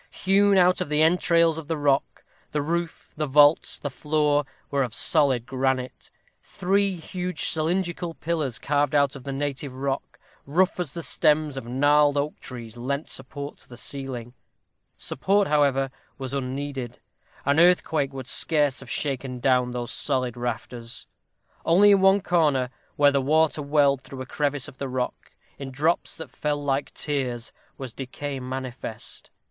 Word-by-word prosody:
Hewn 200 +1 +3
out 180 0 +4
of - - -2
the 150 +1 +3
entrails 165 -1 +3
of 155 - -10
the 160 -1 -1
rock, 140 -2 0 0.3
the 150 - +1
roof, 170 +2 -3
the 150 0 -2
vaults, 145 +2 +5
the 145 - -5
floor, 150 0 +1 0.3
were 140 -1 +1
of 120 -5 -2
solid 135 -7 +2
granite. 130 -1 -2 0.3
Three 195 +1 0
huge 180 0 -3
cylindrical 175 +1 0
pillars, 155 -7 -2
carved 145 +1 0
out 140 -2 +3
of 135 - -10
the 140 - -3
native 140 -1 -3
rock, 135 +1 -3 0.3
rough 180 +6 +2
as 170 -4 -3
the 170 - -4
stems 150 -2 +2
of 135 -3 -6
gnarled 145 +3 +3
oak 145 +2 -2
trees, 120 -2 -9
lent 140 +5 -3
support 140 +2 -6
to - - -17
the 120 - -11
ceiling. 125 -3 -5 0.6
Support, 195 +8 +1
however, 140 -3 +2 0.3
was 135 -1 -6
unneeded; 135 -2 -4 0.5
an 140 +2 +3
earthquake 160 -5 +3
would 130 -2 -7
scarce 145 -3 +1
have 135 - -11
shaken 135 -3 -2
down 125 0 +2
those 120 -1 -4
solid 130 -4 0
rafters. 120 0 -5 0.6
Only 200 +5 +6
in 200 -1 +5
one 195 +1 +5
corner, 150 -9 +2 0.2
where 145 0 +5
the 140 -1 +1
water 155 +2 +2
welled 140 -2 +3
through 130 -1 -8
a - - -10
crevice 145 0 -1
of 130 - -13
the 140 - -3
rock, 125 -1 -4 0.3
in 135 -1 -5
drops 150 +6 0
that 160 - -8
fell 150 -1 -1
like 140 0 -1
tears, 125 -6 -3 0.2
was 130 -4 -7
decay 135 +2 -5
manifest. 130 -3 -6
145 Hz, 160 wpm, -25 LUFS, 130-155 Hz, 0.6 s, Only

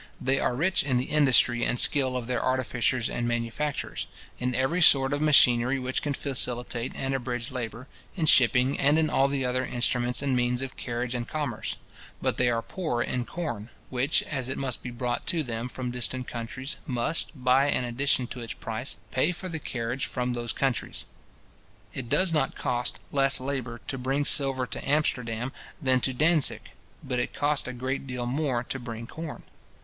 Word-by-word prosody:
They 135 +1 +1
are 125 - +1
rich 185 +8 +2
in 135 -3 +1
the 125 - +1
industry 130 -5 +4
and 125 - +1
skill 130 -3 +4
of 125 - -4
their 125 +1 -1
artificers 125 -1 +1
and 120 - -2
manufacturers, 120 +5 -2 0.3
in 125 0 -1
every 135 +8 +1
sort 135 -3 +6
of 145 - -1
machinery 130 -4 +5
which 130 0 -2
can 145 -2 -1
facilitate 125 -3 -1
and 135 0 -2
abridge 120 -2 -3
labour; 125 0 -5 0.3
in 170 -5 0
shipping, 130 -1 +4
and 145 +3 +4
in 160 -1 +2
all 135 - +4
the 140 -2 -1
other 125 +1 0
instruments 125 +1 0
and 135 -2 +1
means 125 +1 +1
of 135 - -6
carriage 120 0 -3
and 120 -1 -3
commerce: 145 -7 -3 0.4
but - - 0
they 125 0 +3
are 115 -1 0
poor 155 -11 -2
in 125 -1 -2
corn, 120 -11 -4 0.2
which, 130 +4 +1
as 130 -4 -4
it 130 - -2
must 130 -3 -3
be 125 - -5
brought 120 0 -3
to 170 -3 +1
them 120 -1 -4
from 125 -1 -4
distant 125 +1 -1
countries, 125 +4 -4
must, 125 +5 0
by 130 +1 +3
an 130 - +1
addition 125 +1 +1
to 125 - -8
its 115 - -4
price, 115 +4 -4
pay 140 +7 +2
for 185 +1 -6
the 160 -2 -3
carriage 120 -2 -3
from 125 0 -2
those 120 -1 -2
countries. 135 -3 -1 0.9
It 120 -3 -5
does 165 +5 +3
not 150 -4 +1
cost 120 0 -1
less 135 -1 +3
labour 130 -3 -3
to 135 - -3
bring 135 +3 0
silver 135 -3 +3
to 125 - -6
Amsterdam 125 -5 0 0.3
than 130 -4 +2
to 130 - 0
Dantzic; 155 +3 +2 0.3
but 125 -1 -1
it - - -2
costs 145 -2 +1
a - - -3
great 130 +2 -3
deal 125 -1 -3
more 130 -1 0
to 135 - -4
bring 115 -2 -6
corn. 160 +5 -7
130 Hz, 185 wpm, -27 LUFS, 120-140 Hz, 0.9 s, sort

